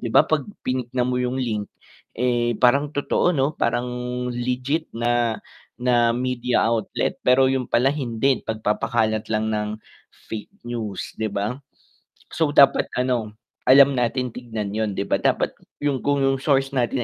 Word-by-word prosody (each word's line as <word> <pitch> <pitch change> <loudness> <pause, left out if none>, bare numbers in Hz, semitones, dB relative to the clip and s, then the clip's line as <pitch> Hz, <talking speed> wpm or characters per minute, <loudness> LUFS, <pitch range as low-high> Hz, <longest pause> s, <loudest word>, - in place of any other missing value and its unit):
'di 115 - -4
ba - - +5
'pag 155 -3 +1 0.2
pinignan 125 -1 -1
mo 125 0 0
'yung 125 +1 -1
link 110 -5 -2 0.5
eh, 120 -2 +1
parang 140 +4 +3
totoo 145 +4 +1
'no? 145 -1 0
Parang 120 +1 0 0.5
legit 125 +6 -2
na 120 -1 0 0.4
na 120 -1 +3
media 125 0 0
outlet, 115 -2 -1
pero 130 +1 +5
'yun 130 -1 -1
pala 130 +4 +3
hindi 130 -2 0
pagpapakalat 110 0 -1
lang 110 0 0
ng 105 0 -1 0.6
fake 110 -1 -6 0.2
news 115 -5 -5
'di 110 -1 -3
ba? 105 +4 -2 0.8
So, 160 -3 +1
dapat, 140 -1 +5
ano 120 -4 -1 0.3
alam 140 +1 +8
natin 125 0 -1
tignan 110 -5 -5
'yun 110 -3 -2
'di 100 - -1
ba, - - 0
dapat - - +1 0.3
'yung 145 -3 -1
kung 140 -1 +1
'yung 135 -1 +1
source 135 -1 +1
natin 125 0 0
125 Hz, 150 wpm, -23 LUFS, 110-135 Hz, 0.8 s, alam